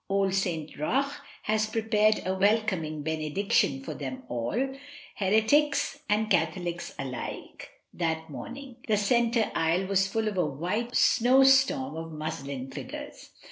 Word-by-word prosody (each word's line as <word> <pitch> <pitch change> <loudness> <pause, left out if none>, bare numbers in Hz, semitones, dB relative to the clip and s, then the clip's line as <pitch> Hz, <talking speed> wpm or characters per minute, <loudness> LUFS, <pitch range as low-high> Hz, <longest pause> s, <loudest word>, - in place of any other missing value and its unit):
Old 195 -1 +1
St 170 -5 -1
Roch 275 - 0 0.3
had 215 0 0
prepared 215 -1 +2
a 185 - 0
welcoming 190 -7 +1
benediction 155 -2 0
for - - -5
them 130 -2 -6
all, 210 - -1 0.4
heretics 275 +9 +2
and 215 +1 +2
Catholics 175 -4 -1
alike, 130 -3 -6 0.2
that 160 -2 -2
morning. 250 - -8
The 215 -2 +3
centre 235 +2 +2
aisle 165 +4 +1
was 195 0 +2
full 220 +2 -1
of 205 -3 -1
a 175 - +3
white 185 - -3
snowstorm 265 - +4
of 165 0 -6
muslin 140 -4 -5
figures. - - -8
195 Hz, 130 wpm, -28 LUFS, 160-225 Hz, 0.4 s, snowstorm